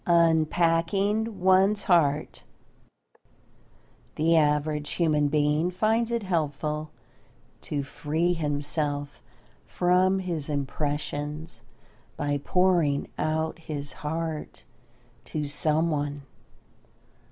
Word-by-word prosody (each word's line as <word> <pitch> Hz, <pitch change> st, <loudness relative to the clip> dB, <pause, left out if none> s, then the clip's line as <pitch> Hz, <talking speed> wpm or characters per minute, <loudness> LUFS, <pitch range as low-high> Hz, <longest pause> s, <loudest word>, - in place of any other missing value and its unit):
UNPACKING 170 Hz, +6 st, +2 dB
ONE'S 190 Hz, +2 st, +4 dB
HEART 155 Hz, -5 st, +2 dB, 1.7 s
The 165 Hz, +2 st, +3 dB
average 150 Hz, -1 st, +1 dB
human 150 Hz, -4 st, +2 dB
being 150 Hz, +3 st, +1 dB
finds 220 Hz, +5 st, +1 dB
it 235 Hz, -2 st, -1 dB
helpful 155 Hz, -3 st, -2 dB, 0.7 s
to 145 Hz, -1 st, -3 dB
free 160 Hz, +5 st, -1 dB
himself 145 Hz, -2 st, -2 dB, 0.5 s
from 185 Hz, +2 st, +2 dB
his 170 Hz, -6 st, -3 dB
impressions 145 Hz, +2 st, -3 dB, 0.6 s
by 145 Hz, 0 st, -1 dB
"pouring 175 Hz, -6 st, +2 dB
out 160 Hz, +1 st, -1 dB
his 145 Hz, -3 st, -5 dB
heart" 160 Hz, 0 st, -5 dB, 0.6 s
to 150 Hz, -2 st, -3 dB
someone. 145 Hz, -1 st, 0 dB
155 Hz, 80 wpm, -26 LUFS, 145-175 Hz, 1.7 s, ONE'S